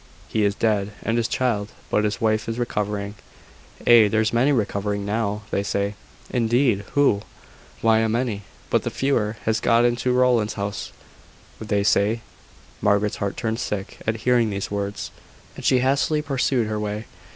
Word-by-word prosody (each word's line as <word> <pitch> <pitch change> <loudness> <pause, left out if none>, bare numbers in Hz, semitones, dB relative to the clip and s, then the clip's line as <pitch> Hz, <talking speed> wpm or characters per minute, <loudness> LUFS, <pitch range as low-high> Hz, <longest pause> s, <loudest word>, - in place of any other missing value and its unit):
"He 110 - 0
is 100 0 +2
dead 105 -3 0
and 115 - 0
his 115 -1 +1
child: 105 -5 -1 0.2
but 105 - +2
his 105 -2 -1
wife 110 0 +1
is 115 - -3
recovering." 105 -4 -2 0.7
"Ay, 115 -3 +7
there's 110 +2 +1
many 125 +5 +3
recovering 100 -4 -1
now, 105 0 -1
they - - +1
say." 100 0 -1 0.4
"Indeed! 120 -3 +2
who?" 140 -8 +3 0.6
"Why, 110 -1 +5
a 110 0 +1
many. 115 -2 -1 0.3
But - - +3
the - - -2
fever 115 -6 0
has 110 0 +1
got 115 +1 +3
into 120 +1 +1
Rowland's 125 -4 +2
house, 100 0 -4 0.7
they 105 -2 0
say." 105 +2 +2 0.6
Margaret's 100 0 +2
heart 100 -1 -3
turned 115 0 -2
sick 105 -3 -4
at 110 0 -1
hearing 120 -3 +4
these 100 -1 -4
words, 100 0 -3 0.4
and - - -9
she 130 -1 +4
hastily 140 +3 +1
pursued 135 -4 +1
her 110 0 -2
way. 105 +1 -3
110 Hz, 160 wpm, -23 LUFS, 105-120 Hz, 0.7 s, Ay